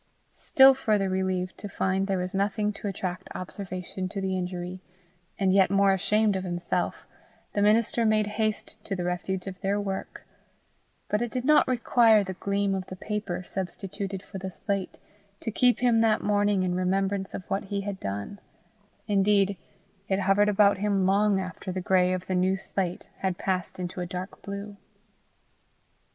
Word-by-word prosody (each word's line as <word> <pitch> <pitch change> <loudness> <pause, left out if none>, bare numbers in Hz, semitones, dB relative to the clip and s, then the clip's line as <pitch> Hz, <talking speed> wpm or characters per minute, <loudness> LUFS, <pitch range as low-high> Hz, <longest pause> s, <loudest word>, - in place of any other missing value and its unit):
Still 270 0 +7
further 210 -7 +1
relieved 185 -1 -1
to 205 - -6
find 190 0 0
there 195 -1 0
was 180 +1 -3
nothing 205 +2 0
to 205 - -6
attract 185 -1 -4
observation 185 0 -5
to 200 - -5
the 190 -1 -1
injury, 180 0 -4 0.6
and 190 -2 +2
yet 190 -1 +5
more 195 0 +4
ashamed 210 +2 +2
of 190 - -2
himself, 175 -1 -2 0.5
the 205 - 0
minister 220 +3 +3
made 215 -1 +3
haste 215 0 -3
to 195 - -2
the 180 - -3
refuge 180 +1 -2
of 185 -2 -7
their 200 +1 0
work; 195 -1 -5 0.8
but 210 - 0
it 240 - -1
did 250 +3 -3
not 300 +1 +5
require 230 -3 +4
the 190 -1 -5
gleam 200 +1 0
of 190 -1 -3
the 185 - -7
paper 205 -2 -4
substituted 195 +1 -5
for 195 - -8
the 190 0 -4
slate, 195 +1 -3 0.4
to 225 - -4
keep 245 +3 +3
him 235 -2 +4
that 220 -1 +2
morning 205 -2 +2
in 180 -1 0
remembrance 190 +2 0
of 185 - -7
what 195 - -2
he 200 0 -2
had 200 -1 -5
done; 100 - -5 0.7
indeed 200 -1 +3 0.5
it 195 0 +1
hovered 200 +2 +3
about 200 -1 +4
him 200 -2 +1
long 200 +1 +3
after 185 0 -5
the 185 - -3
gray 180 0 +3
of 185 0 -2
the 185 - -2
new 185 +1 +2
slate 185 -2 -3
had 190 -2 -1
passed 185 -2 -2
into 180 0 -4
a 175 - -3
dark 180 +2 -6
blue. 200 +1 -7
195 Hz, 170 wpm, -27 LUFS, 185-205 Hz, 0.8 s, Still